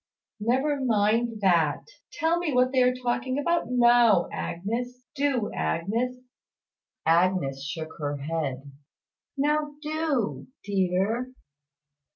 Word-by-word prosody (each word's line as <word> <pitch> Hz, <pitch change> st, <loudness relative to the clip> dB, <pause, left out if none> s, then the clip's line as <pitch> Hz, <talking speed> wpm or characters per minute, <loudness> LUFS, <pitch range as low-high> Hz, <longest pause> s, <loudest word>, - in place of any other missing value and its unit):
"Never 265 Hz, +6 st, +1 dB
mind 225 Hz, 0 st, +1 dB
that. 170 Hz, -6 st, +2 dB, 0.3 s
Tell 330 Hz, +2 st, +1 dB
me 345 Hz, -3 st, -1 dB
what 250 Hz, 0 st, +3 dB
they 260 Hz, -1 st, +3 dB
are 250 Hz, 0 st, +3 dB
talking 255 Hz, +1 st, -2 dB
about 340 Hz, +4 st, +1 dB
now. 240 Hz, -6 st, +4 dB, 0.8 s
Do, 275 Hz, -6 st, 0 dB
Agnes." 210 Hz, -, -1 dB, 0.9 s
Agnes 165 Hz, -5 st, +2 dB
shook 160 Hz, +2 st, -5 dB
her 145 Hz, -1 st, -2 dB
head. 140 Hz, -2 st, -4 dB, 0.7 s
"Now 295 Hz, +1 st, 0 dB
do, 305 Hz, -7 st, -1 dB, 0.2 s
dear." 200 Hz, +5 st, 0 dB
235 Hz, 100 wpm, -26 LUFS, 175-260 Hz, 0.9 s, now